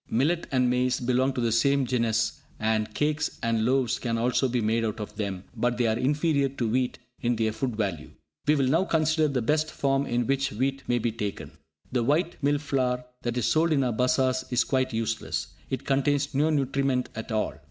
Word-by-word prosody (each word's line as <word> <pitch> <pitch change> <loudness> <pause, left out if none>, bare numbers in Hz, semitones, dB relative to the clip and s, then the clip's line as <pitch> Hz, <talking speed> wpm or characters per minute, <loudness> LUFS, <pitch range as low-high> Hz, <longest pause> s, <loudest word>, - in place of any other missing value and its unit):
Millet 155 +9 +1
and 130 -2 +3
maize 125 +1 +1
belong 130 +2 +1
to 130 - -3
the 115 -1 +1
same 140 +4 +3
genus, 115 -2 0 0.2
and 110 0 0
cakes 150 +1 0
and 115 -1 +1
loaves 125 0 +1
can 115 -2 -1
also 125 +3 +2
be 125 0 0
made 115 +1 +1
out 110 0 -2
of 105 0 -6
them, 100 -3 -3
but 120 +1 0
they 120 - +2
are 110 -1 +2
inferior 145 +2 +1
to 130 -3 -2
wheat 125 +3 0 0.2
in 120 0 +1
their 110 -1 0
food 125 +1 -3
value. 90 -8 -2 0.4
We 150 - +5
will 140 -2 +2
now 165 +8 +2
consider 155 -2 +2
the 130 -5 -1
best 155 +5 +1
form 135 -1 0
in 120 0 0
which 135 -1 0
wheat 135 +5 -1
may 120 - +2
be 120 0 0
taken. 105 -3 -5 0.4
The 125 - +1
white 155 +8 0
"mill 145 +1 +2
flour" 130 -4 -1 0.2
that 120 0 -2
is 120 - +1
sold 160 +1 +2
in 140 -2 +2
our 125 -2 0
bazars 130 +2 +1
is 125 -1 +2
quite 130 -1 0
useless; 115 0 -2 0.2
it 130 - -3
contains 145 +1 +1
no 145 +4 +2
nutriment 135 -3 0
at 110 +1 -6
all. 110 -6 0
125 Hz, 205 wpm, -27 LUFS, 115-140 Hz, 0.4 s, We